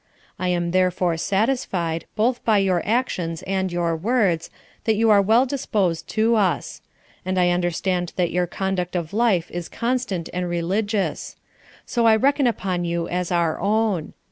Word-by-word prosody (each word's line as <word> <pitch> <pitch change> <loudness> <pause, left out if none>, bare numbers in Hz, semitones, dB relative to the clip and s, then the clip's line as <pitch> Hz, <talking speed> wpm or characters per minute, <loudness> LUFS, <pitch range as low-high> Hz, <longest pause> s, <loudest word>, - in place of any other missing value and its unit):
I 185 - -1
am 175 -1 0
therefore 180 -1 +1
satisfied, 190 -5 -1
both 240 +3 +1
by 220 -2 +3
your 190 -3 +2
actions 185 -8 -1
and 190 -1 -1
your 170 -1 0
words, 190 -3 +1 0.4
that 220 - +3
you 225 +1 +3
are 205 -1 +6
well 225 +6 +4
disposed 210 - -1
to 225 +1 +3
us; 200 -3 -1 0.4
and 185 0 -1
I 180 -1 +4
understand 175 0 -1
that 175 -2 0
your 180 +1 0
conduct 185 0 -2
of 170 -1 -3
life 210 -7 +1
is 175 -1 -5
constant 235 -8 -2
and 180 0 -2
religious: 195 +4 -1 0.5
so 235 -2 +1
I 220 - +6
reckon 275 +3 +2
upon 185 -6 -1
you 170 0 -2
as 180 0 -2
our 170 -2 +1
own. 205 -4 0
185 Hz, 160 wpm, -22 LUFS, 175-220 Hz, 0.5 s, are